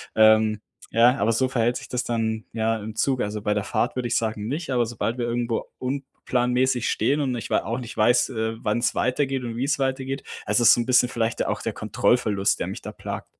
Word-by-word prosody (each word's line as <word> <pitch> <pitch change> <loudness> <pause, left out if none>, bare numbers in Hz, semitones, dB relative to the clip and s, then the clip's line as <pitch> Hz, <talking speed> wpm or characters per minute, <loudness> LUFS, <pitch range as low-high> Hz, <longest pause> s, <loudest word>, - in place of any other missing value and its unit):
Ähm, 110 -1 +5 0.3
ja, 120 +3 +5
aber 115 - +2
so 130 +4 +2
verhält 120 -1 +1
sich - - -9
das 125 0 -2
dann, 110 -2 -2
ja, 115 0 0
im 110 +1 -7
Zug. 130 +2 +1
Also 105 +1 -3
bei 105 0 0
der 105 -1 -1
Fahrt 120 - -1
würde 125 -1 -2
ich - - -1
sagen, 110 -2 -2
nicht, 150 +4 -3
aber 120 -2 +2
sobald 115 +1 -3
wir 120 - 0
irgendwo 120 -1 -1
unplanmäßig 125 -1 -1
stehen 145 +2 +1
und 130 -3 -1
ich 115 - -6
wei - - +2
auch 115 +2 -3
nicht 120 -2 -8
weiß, 120 +2 +3
äh, 110 -2 -2
wann's 115 +3 0
weitergeht 135 +1 0
und 115 -2 -5
wie's 135 +5 0
weitergeht. 135 0 -2 0.2
Also, 120 - +2
es - - +7
ist - - +9
so 120 - +2
'n - - -3
bisschen 125 -1 +4
vielleicht 115 -1 -1
der - - 0
auch - - -3
der - - -3
Kontrollverlust, 105 -5 +1
der - - -2
mich - - -6
da - - -7
plagt. - - -6
120 Hz, 235 wpm, -24 LUFS, 110-130 Hz, 0.3 s, ist